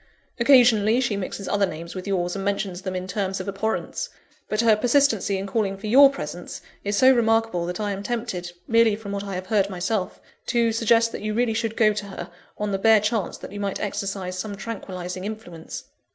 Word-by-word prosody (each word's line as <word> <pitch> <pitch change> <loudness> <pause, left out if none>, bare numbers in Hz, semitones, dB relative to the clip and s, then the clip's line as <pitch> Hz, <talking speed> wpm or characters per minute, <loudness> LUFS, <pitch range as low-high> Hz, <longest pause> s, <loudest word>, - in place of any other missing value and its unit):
Occasionally 235 -3 +5
she 240 -5 0
mixes 200 0 -5
other 205 -1 +2
names 170 0 -7
with 185 +1 -7
yours, 180 -2 -1
and 195 - -3
mentions 195 -2 -2
them 185 -1 -4
in 185 0 -3
terms 190 0 -2
of 185 - -6
abhorrence; 200 +3 -2 0.4
but 215 +1 +1
her 225 -2 +5
persistency 230 -4 +2
in 190 - -4
calling 195 -1 -1
for 200 - -9
your 270 +6 +8
presence, 175 - -6 0.2
is 205 0 -1
so 260 +3 +7
remarkable 225 -7 +1
that 180 +2 -4
I 205 -1 -1
am 195 0 -4
tempted, 210 -6 -3 0.2
merely 230 -2 +4
from 210 -2 -8
what 200 0 -3
I 200 -2 -5
have 185 0 -4
heard 200 0 +1
myself; 185 +1 -2 0.3
to 235 -1 +2
suggest 230 0 +3
that - - -6
you 215 0 -2
really 240 -1 +1
should 225 0 -2
go 215 -2 +4
to 205 -1 -5
her, 180 -2 -8 0.3
on 210 -1 -2
the 195 - -1
bare 220 +1 +6
chance 210 -1 -1
that - - -10
you 205 - -7
might 200 -1 -2
exercise 195 -3 -3
some 200 +1 -4
tranquillising 185 -4 -6
influence. 195 -6 -7
205 Hz, 210 wpm, -24 LUFS, 190-225 Hz, 0.4 s, your